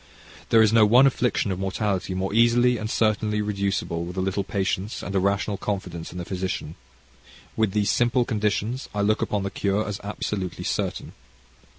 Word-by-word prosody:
There 115 -1 +6
is 110 0 +3
no 115 -1 +6
one 120 +6 +6
affliction 125 -6 +1
of 95 - -3
mortality 95 -1 -2
more 95 +1 -2
easily 120 +1 +4
and 110 0 -4
certainly 110 -1 +1
reducible, 100 -5 -1
with 90 +2 -7
a - - +1
little 95 +1 -1
patience, 95 +1 -2
and 100 - -5
a 95 - +2
rational 100 +1 0
confidence 90 -5 -4
in 90 - -9
the 90 - -5
physician. 95 -4 -4 0.8
With 110 -4 +1
these 105 -1 +2
simple 120 +1 +2
conditions, 110 +4 -1
I 105 - 0
look 110 +1 +2
upon 105 -2 -1
the 100 - -3
cure 100 +2 0
as 105 -1 -4
absolutely 100 -3 -4
certain. - - -3
100 Hz, 180 wpm, -24 LUFS, 95-110 Hz, 0.8 s, There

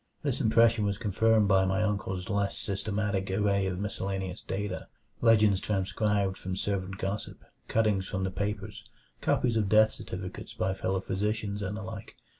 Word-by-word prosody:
This 140 -2 0
impression 115 -2 +4
was 100 -1 0
confirmed 110 +1 +3
by 95 -1 +5
my 95 +2 +1
uncle's 95 -3 -2
less 100 -1 0
systematic 100 -1 -1
array 100 0 +1
of 90 -1 -2
miscellaneous 95 -2 -3
data 95 -1 -4 0.3
legends 110 -4 +5
transcribed 100 0 0
from 95 0 -4
servant 95 -1 -2
gossip, 95 +2 -4 0.2
cuttings 105 -4 +1
from 95 0 -2
the 95 - -1
papers, 100 +1 -4 0.3
copies 120 -3 +2
of 105 -3 +1
death 110 +1 +6
certificates 90 0 -7
by 95 +1 0
fellow 95 0 -1
physicians, 105 +1 -2
and 105 +1 -3
the 110 - -6
like. 110 -1 -8
100 Hz, 155 wpm, -29 LUFS, 95-105 Hz, 0.3 s, death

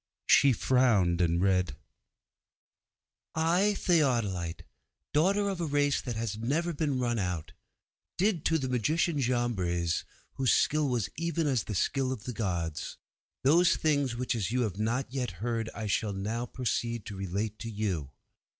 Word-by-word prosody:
She 140 - +6
frowned 110 -8 +3
and 85 0 +2
read 90 -5 +2 1.6
'_I, 175 +6 +3
Theodolitê, 115 - +1 0.5
daughter 195 +7 +3
of 190 -3 -2
a 165 - -1
race 145 -1 +2
that 120 -3 -4
has 110 -1 -3
never 160 +9 0
been 145 -3 -1
run 120 -2 0
out, 90 -5 -3 0.7
did 190 -4 +1
to 160 - +3
the 135 -4 -2
magician 150 +6 +1
Jambres, 95 -10 0 0.3
whose 130 -3 +2
skill 150 -1 +2
was 115 -7 -1
even 170 -1 -1
as 130 -5 +1
the 105 - -4
skill 130 +7 0
of 120 -6 -5
the 125 - -5
gods, 85 -8 -3 0.5
those 165 +6 +5
things 145 -5 +1
which 125 +1 -1
as 105 -5 -1
you 125 +1 +1
have 105 -4 -2
not 120 +4 -1
yet 125 -7 -2
heard 115 +2 -2
I 110 - -4
shall 105 0 0
now 110 +5 -3
proceed 120 -2 -2
to 105 - -7
relate 100 +3 -3
to 115 - -5
you. 100 -10 -2
120 Hz, 155 wpm, -29 LUFS, 100-145 Hz, 1.6 s, She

